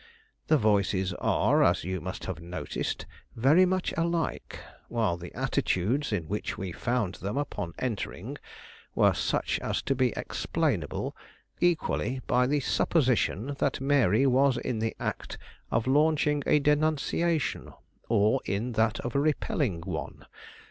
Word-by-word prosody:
The 155 Hz, -, +5 dB
voices 100 Hz, -4 st, +1 dB
are, -, -, +2 dB
as -, -, +3 dB
you 95 Hz, +1 st, -3 dB
must 95 Hz, +1 st, -6 dB
have 90 Hz, -3 st, -5 dB
noticed, 85 Hz, -3 st, -4 dB, 0.3 s
very 150 Hz, +11 st, +5 dB
much 185 Hz, 0 st, -1 dB
alike, 170 Hz, 0 st, -2 dB, 0.3 s
while 110 Hz, -7 st, 0 dB
the 85 Hz, 0 st, -9 dB
attitudes 120 Hz, +11 st, 0 dB
in 90 Hz, -7 st, -2 dB
which 105 Hz, +4 st, -3 dB
we 95 Hz, -2 st, -4 dB
found 115 Hz, -1 st, -1 dB
them 100 Hz, +5 st, -3 dB
upon 135 Hz, -12 st, -3 dB
entering 120 Hz, -5 st, -4 dB, 0.6 s
were -, -, +4 dB
such -, -, -1 dB
as -, -, -2 dB
to -, -, +1 dB
be 130 Hz, -2 st, +2 dB
explainable -, -, -2 dB, 0.4 s
equally 155 Hz, -6 st, +1 dB
by 125 Hz, +1 st, +2 dB
the 145 Hz, +1 st, +1 dB
supposition 130 Hz, -, +1 dB
that 135 Hz, -, 0 dB
Mary 135 Hz, -3 st, +3 dB
was 135 Hz, 0 st, +4 dB
in 120 Hz, -2 st, -2 dB
the 110 Hz, 0 st, -1 dB
act -, -, -4 dB, 0.3 s
of 115 Hz, 0 st, 0 dB
launching 150 Hz, +1 st, +3 dB
a -, -, +5 dB
denunciation, 155 Hz, +2 st, +1 dB, 0.4 s
or 110 Hz, +3 st, +3 dB
in 105 Hz, +6 st, -2 dB
that 110 Hz, -1 st, +1 dB
of 120 Hz, -, -4 dB
repelling 140 Hz, -, 0 dB
one. 90 Hz, +2 st, -6 dB
125 Hz, 135 wpm, -28 LUFS, 100-145 Hz, 0.6 s, The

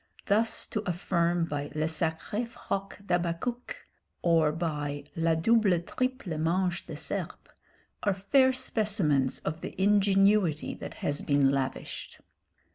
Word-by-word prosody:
Thus 220 Hz, +3 st, +2 dB
to 215 Hz, -, -1 dB
affirm 175 Hz, -1 st, +1 dB
by 145 Hz, -2 st, -3 dB
le 155 Hz, 0 st, +1 dB
sacré 160 Hz, +8 st, -1 dB
froc 195 Hz, -4 st, -5 dB
d'Habacuc, 175 Hz, +8 st, -2 dB, 0.5 s
or 165 Hz, -3 st, +4 dB
by 150 Hz, -3 st, -3 dB
la 165 Hz, 0 st, +2 dB
double 200 Hz, +1 st, +3 dB
triple 255 Hz, -, -3 dB
manche 175 Hz, +2 st, 0 dB
de -, -, -6 dB
serpe, -, -, -5 dB, 0.5 s
are 200 Hz, -2 st, +1 dB
fair 260 Hz, +8 st, +4 dB
specimens 200 Hz, -, +1 dB
of 155 Hz, +2 st, -4 dB
the -, -, -7 dB
ingenuity 195 Hz, -4 st, +3 dB
that -, -, -8 dB
has 145 Hz, 0 st, -1 dB
been 140 Hz, -2 st, +3 dB
lavished. 135 Hz, -1 st, -4 dB
175 Hz, 120 wpm, -29 LUFS, 155-205 Hz, 0.5 s, or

